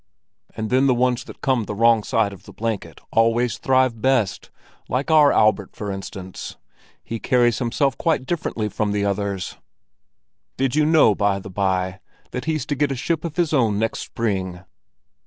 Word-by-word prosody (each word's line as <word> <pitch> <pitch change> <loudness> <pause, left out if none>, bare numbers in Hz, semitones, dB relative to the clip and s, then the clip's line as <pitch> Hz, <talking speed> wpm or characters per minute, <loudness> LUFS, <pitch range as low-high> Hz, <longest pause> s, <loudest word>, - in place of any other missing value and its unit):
And 110 0 -3
then 130 +2 +4
the 130 - +3
ones 125 0 +1
that - - -12
come 130 -5 +1
the 105 - -5
wrong 115 +1 +4
side 105 -1 0
of 95 - -14
the - - -11
blanket 115 -3 -4
always 115 +1 +2
thrive 130 -4 +2
best—like 130 - -2
our 150 -2 +6
Albert, 105 -2 +2
for 105 -2 -4
instance. 95 -1 -7 0.5
He 115 - -5
carries 120 -1 +2
himself 130 +2 0
quite 155 -6 +1
differently 130 -8 -2
from 105 0 -1
the 100 -1 0
others. 100 -2 -2 1.0
Did 135 0 0
you 150 0 +3
know, 155 -9 +5
by 100 -1 +1
the 100 0 -9
by, 95 -1 -1 0.3
that 125 - -4
he's 155 -2 -1
to 145 - -2
get 145 0 +1
a - - -1
ship 155 +5 -2
of 165 -3 -5
his 170 -3 +1
own 115 -8 +2
next 115 +2 -1
spring?" 95 -6 -3
115 Hz, 175 wpm, -22 LUFS, 100-135 Hz, 1.0 s, our